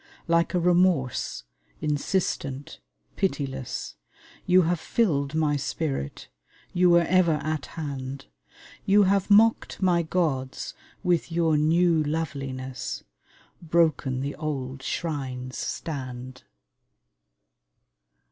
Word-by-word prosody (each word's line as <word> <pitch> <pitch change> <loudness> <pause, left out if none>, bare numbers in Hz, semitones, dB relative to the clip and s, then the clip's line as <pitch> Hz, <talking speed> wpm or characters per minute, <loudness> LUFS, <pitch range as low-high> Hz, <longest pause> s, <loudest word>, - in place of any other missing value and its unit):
Like 170 +2 +2
a - - +3
remorse, 175 -6 +2 0.4
insistent, 145 -2 -2 0.4
pitiless, 135 - -3 0.5
You 185 0 +6
have 170 0 +1
filled 155 -9 0
my 150 -2 +2
spirit, 140 - -3 0.5
you 180 0 +4
were 170 0 +6
ever 175 -1 +3
at 155 -2 -2
hand; 135 -3 -5 0.6
You 205 0 +5
have 195 +1 +2
mocked 220 +2 +4
my 180 -3 +3
gods 155 -6 -1 0.3
with 175 -2 +1
your 165 -2 +2
new 165 +2 +3
loveliness: 135 -4 -4 0.6
Broken 155 -6 +1
the 140 +1 -3
old 135 -4 -4
shrines 135 -5 -4
stand. 130 -2 -5
155 Hz, 95 wpm, -26 LUFS, 135-175 Hz, 0.6 s, You